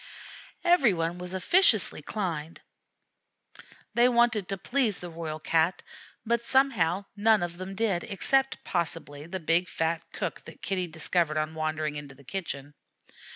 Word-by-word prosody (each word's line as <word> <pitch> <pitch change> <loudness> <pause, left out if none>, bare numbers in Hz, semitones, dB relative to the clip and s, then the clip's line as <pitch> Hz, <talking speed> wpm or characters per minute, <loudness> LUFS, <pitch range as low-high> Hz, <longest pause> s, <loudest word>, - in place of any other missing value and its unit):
Every 345 - +5
one 165 +1 -2
was 180 +1 -5
officiously 215 - +4
kind. 165 -4 -4 1.3
They 240 +1 +5
wanted 235 -5 +2
to 195 - -1
please 235 +1 +1
the 175 -1 -8
Royal 160 -2 -5
Cat, 165 +3 +1 0.4
but 235 +1 +1
somehow 205 -9 +2
none 215 -1 +4
of 175 0 -4
them 185 +1 -6
did, 200 -5 0
except, 270 +7 +1
possibly, 160 -3 -2
the 190 +2 -4
big, 165 +2 +1
fat 165 0 -1
cook - - -4
that - - -13
Kitty 185 -2 -1
discovered 160 0 0
on 155 +1 -1
wandering 155 -1 -2
into 145 -2 -8
the 140 - -17
kitchen. 145 -3 -5
180 Hz, 145 wpm, -28 LUFS, 160-215 Hz, 1.3 s, Every